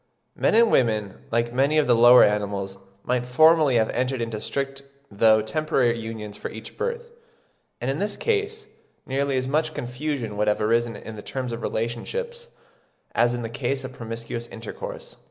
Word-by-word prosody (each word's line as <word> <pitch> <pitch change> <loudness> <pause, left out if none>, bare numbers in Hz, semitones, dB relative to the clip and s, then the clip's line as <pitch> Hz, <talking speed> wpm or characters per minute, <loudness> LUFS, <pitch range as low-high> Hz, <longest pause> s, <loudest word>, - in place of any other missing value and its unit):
Men - - +2
and 230 0 +5
women, 110 -5 +1
like 120 +1 0
many 140 +4 +2
of 155 - +4
the 120 - +4
lower 120 +2 +8
animals, 100 -2 -1 0.2
might 125 0 -1
formerly 155 0 +5
have 110 -1 +2
entered 130 +1 -1
into 115 -2 -3
strict 135 0 -3 0.3
though 110 +1 +4
temporary 125 0 +1
unions 110 -2 -6
for - - -5
each 110 0 -10
birth, 475 0 -4 0.7
and - - -1
in - - -3
this - - -2
case 435 -1 -1 0.4
nearly 135 0 0
as 130 0 -1
much 155 +3 0
confusion 125 -3 -4
would 105 0 +1
have 105 - +2
arisen 115 +1 +1
in 110 +1 -9
the - - -7
terms 130 +2 -4
of 115 0 -5
relationship 120 - -3 0.8
as 120 +1 +3
in 120 - -4
the - - -2
case 135 +3 -2
of 130 - -7
promiscuous 115 0 -6
intercourse. 115 -2 -8
120 Hz, 175 wpm, -24 LUFS, 110-140 Hz, 0.8 s, lower